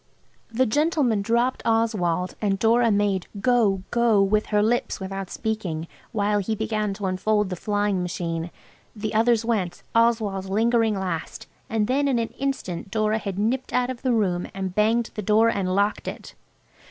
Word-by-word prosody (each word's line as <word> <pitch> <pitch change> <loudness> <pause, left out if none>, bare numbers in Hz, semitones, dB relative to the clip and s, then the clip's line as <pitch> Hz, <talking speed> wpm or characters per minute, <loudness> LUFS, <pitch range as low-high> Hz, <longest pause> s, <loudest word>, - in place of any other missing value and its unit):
The 250 +3 +2
gentleman 280 -4 +1
dropped 235 +4 +1
Oswald, 210 -6 +1
and 200 -2 +1
Dora 230 +3 +3
made 200 -3 +1
"Go! 215 -5 +2
go!" 235 -3 +3
with 210 +2 +1
her 210 -1 +2
lips 240 +3 0
without 195 0 -5
speaking, 190 -8 -3 0.2
while 205 -1 +1
he 220 +3 -1
began 215 -1 -1
to 200 - -5
unfold 195 +2 0
the - - -1
flying 205 0 0
machine. 170 -1 -3 0.5
We 215 0 -3
others 225 +1 +3
went, 195 -7 -1
Oswald 225 -4 +2
lingering 225 +2 +2
last, 180 -4 -4 0.2
and 220 -1 +1
then 275 +5 +1
in 265 -3 +2
an 230 -1 -1
instant 260 -11 -4
Dora 215 +1 +1
had 200 -3 -5
nipped 240 +6 -1
out 250 0 +1
of 245 - -8
the 260 - +1
room 185 -6 +1
and 190 -2 -3
banged 225 +3 +2
the 210 - -4
door 215 +3 +4
and 185 -4 -1
locked 205 +1 0
it. - - -7
215 Hz, 165 wpm, -24 LUFS, 195-230 Hz, 0.5 s, door